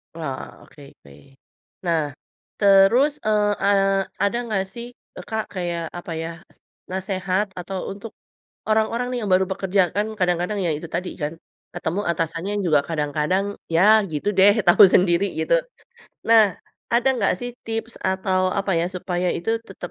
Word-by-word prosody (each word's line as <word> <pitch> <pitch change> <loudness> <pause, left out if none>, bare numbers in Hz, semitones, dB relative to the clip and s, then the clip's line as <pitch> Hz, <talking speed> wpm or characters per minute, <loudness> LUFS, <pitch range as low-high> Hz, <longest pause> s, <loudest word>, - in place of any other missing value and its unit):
Oh, 150 -5 -7
oke 145 - -17 0.2
oke. 70 - -16 0.7
Nah 165 -2 +2 0.6
terus, 200 +8 +5
eee 210 -1 +2
eee, 195 -1 +3 0.2
ada 200 +4 +1
nggak 210 -4 -1
sih, 240 0 -7 0.3
eee, - - -9
Kak, 220 -1 -1
kayak 175 -2 -3
apa 175 - -9
ya, 165 - -4 0.2
s - - -18 0.3
nasehat 190 +1 -1
atau 190 +2 -5
untuk 205 +3 -8 0.6
orang-orang 220 +3 +1
nih 250 - -2
yang 205 -3 -2
baru 185 +1 +4
bekerja, 195 0 +1
kan 205 +1 0
kadang-kadang, 180 +3 0
ya 165 - +1
itu 165 +2 -8
tadi 180 +2 -2
kan, 150 +2 -2 0.4
ketemu 175 +2 -2
atasannya 165 +4 -3
juga 155 -4 +4
kadang-kadang, 155 +4 0 0.3
ya 170 - +5 0.3
gitu 150 +5 -4
deh, 200 +2 +7
tau 175 - +7
sendiri 180 +1 +3
gitu. - - 0 0.8
Nah, 220 -4 +6 0.4
ada 240 +3 +3 0.2
gak - - +3
sih 245 - -4 0.2
tips 225 +1 -4
atau 190 0 0 0.2
apa 195 0 -1
ya, 170 - 0
supaya 180 0 -2
itu 175 - -2 0.2
tetap 180 -2 -8
190 Hz, 155 wpm, -22 LUFS, 175-205 Hz, 0.8 s, deh